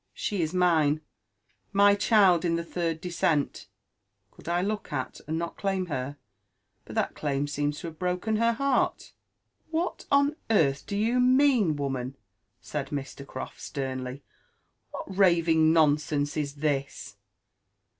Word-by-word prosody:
She 200 -4 -2
is 160 -1 -1
mine— 160 -5 +3 0.7
my 200 0 +6
child 200 -4 +4
in 170 -1 +1
the 170 - -2
third 165 -1 -2
descent; 170 -4 -1 0.6
could - - -17
I 175 +1 +1
look 210 +1 -3
at, 130 -3 -4
and 160 +1 -1
not 170 0 -4
claim 195 -2 -1
her? 135 +2 -4 0.7
But - - -10
that - - 0
claim 145 -1 -1
seems 145 0 -2
to - - -5
have 160 - -16
broken 180 +4 -1
her 230 +1 +3
heart." 275 +4 +1
•* - - -15 0.6
What 330 +2 -2
on 285 +2 +3
earth 140 -11 +2
do 200 - -2
you 230 +4 +2
mean, 250 - +4
woman?" 135 -2 -3 0.4
said 145 -2 -4
Mr. 140 -1 -6
CrofI - - -7
sternly; 130 -2 -4
•* 140 - -12 0.7
what 190 - -7
raving 165 -4 +4
nonsense 150 -2 +2
is 145 -2 -2
this 140 -2 -3
165 Hz, 145 wpm, -27 LUFS, 145-200 Hz, 0.7 s, my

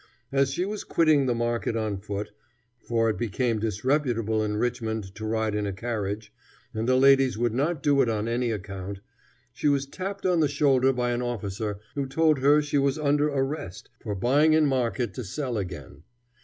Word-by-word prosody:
As 135 0 +2
she 175 +7 -1
was 210 +1 -4
quitting 155 -5 +3
the 120 - +1
market 120 0 -1
on 110 -3 -2
foot, 100 +1 -5 0.5
for 115 -1 0
it 110 - +2
had - - -9
become 115 0 0
disreputable 115 0 0
in 105 0 -2
Richmond 110 -4 -2
to 110 +1 -6
ride 110 -1 0
in 105 -1 -1
a 100 - -3
carriage, 105 -1 -4 0.4
and 110 +2 -2
the 130 - +4
ladies 135 -2 +5
would 120 -1 0
not 145 +4 -1
do 145 -2 +4
it 125 - +2
on 110 0 -1
any 120 +1 0
account, 100 -2 -5 0.5
she 125 - -1
was 140 -1 +2
tapped 190 +7 -6
on 180 -2 +3
the 155 - +4
shoulder 135 -2 +3
by 125 -1 -1
an 120 0 -1
officer 105 -3 -3 0.2
who 140 -1 -2
told 155 +1 +2
her 145 +3 +4
she 145 -1 0
was 140 +1 +1
under 145 0 +2
arrest, 135 - -3
for 105 - -4
buying 140 +10 +3
in 155 -1 +4
market 120 -6 0
to 125 - -5
sell 125 +5 -4
again. 90 - -6
120 Hz, 195 wpm, -26 LUFS, 110-140 Hz, 0.5 s, ladies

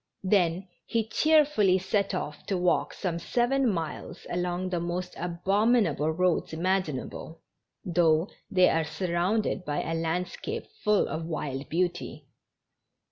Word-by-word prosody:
Then 185 -1 +2 0.2
he 225 -1 0
cheerfully 290 -8 +4
set 195 +1 0
off 150 -4 -5
to 195 - 0
walk 180 0 +1
some 175 -4 -2
seven 245 +7 +1
miles 165 -5 -5
along 180 +1 -1
the 180 -2 -1
most 175 +1 -3
abominable 180 - +1
roads 175 0 +1
imaginable, 165 -3 -2 0.4
though 165 -1 +3 0.2
they 185 -3 +5
are 165 - +2
surrounded 180 +5 -1
by 145 -4 -2
a 165 - -3
landscape 165 +2 -3 0.2
full 210 -1 +3
of 160 0 -4
wild 145 -4 -4
beauty. 175 +1 -2
180 Hz, 125 wpm, -28 LUFS, 165-195 Hz, 0.4 s, they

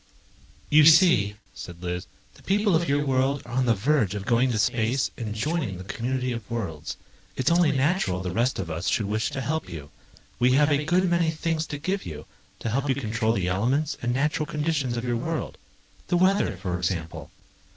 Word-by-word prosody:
"You 150 +1 +7
see," 155 - +6 0.2
said 85 0 -10
Liz, 90 0 -4 0.3
"the - - -19
people 205 -1 +2
of 165 -2 +1
your 145 +1 +1
world 135 +1 +1
are 120 - -10
on 130 0 +1
the 115 - +4
verge 110 -2 +1
of 100 -1 -5
going 120 +3 +2
to 115 - -1
space 120 +4 +1
and 110 -3 -5
joining 135 - -2
the 95 - -8
community 125 +5 -2
of 115 -3 -6
worlds. 95 -11 -4 0.4
It's 130 - +1
only 170 -2 +4
natural 140 - +1
the 90 -1 -4
rest 120 +7 0
of 85 -4 -4
us 85 +3 -3
should 110 - +1
wish 110 +2 -1
to 140 -2 -4
help 155 -3 -2
you. 75 -5 -8 0.5
We 125 +1 +4
have 145 +2 +4
a 145 +1 +1
good 180 +3 +2
many 170 -2 +2
things 160 0 -2
to 145 - -5
give 185 +7 -2
you, 75 -2 -8 0.4
to 115 - -2
help 135 +4 -1
you 135 - +2
control 115 -3 0
the 95 -5 -1
elements 130 +11 0
and 120 - -1
natural 150 +4 0
conditions 150 -6 -1
of 115 - -3
your 120 -1 0
world. 160 +5 -4 0.5
The 175 - +2
weather, 185 - +2
for 90 -2 -3
example 85 -2 -3
125 Hz, 205 wpm, -25 LUFS, 105-150 Hz, 0.5 s, You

